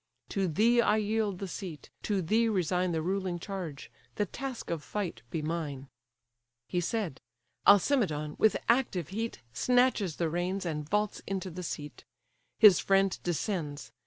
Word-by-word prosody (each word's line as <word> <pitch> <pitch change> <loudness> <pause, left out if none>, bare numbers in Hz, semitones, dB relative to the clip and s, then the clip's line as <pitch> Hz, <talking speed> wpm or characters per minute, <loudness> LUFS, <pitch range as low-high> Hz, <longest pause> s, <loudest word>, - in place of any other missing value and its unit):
To 195 -2 0
thee 230 +9 +4
I 215 -2 +3
yield 215 -2 0
the 195 - -5
seat, 175 -4 -7
to 200 -3 0
thee 225 +7 +3
resign 180 -2 +1
The 160 -1 -1
ruling 185 0 -1
charge: 170 -6 -6 0.2
the 210 - +1
task 260 +2 -6
of 165 -3 -2
fight 185 - -4
be 155 +2 -3
mine." 150 -4 -3 0.8
He 175 - 0
said. 190 - -2 0.5
Alcimedon, 190 - +4
with 220 - +4
active 235 - +2
heat, 225 - -4
Snatches 245 - +2
the 170 - 0
reins, 180 +4 -2
and 150 -3 -3
vaults 210 +1 0
into 190 -1 -3
the 180 +2 -6
seat. 150 -3 -6 0.5
His 210 -5 +8
friend 195 -1 +2
descends. 160 - -3
185 Hz, 150 wpm, -30 LUFS, 165-210 Hz, 0.8 s, His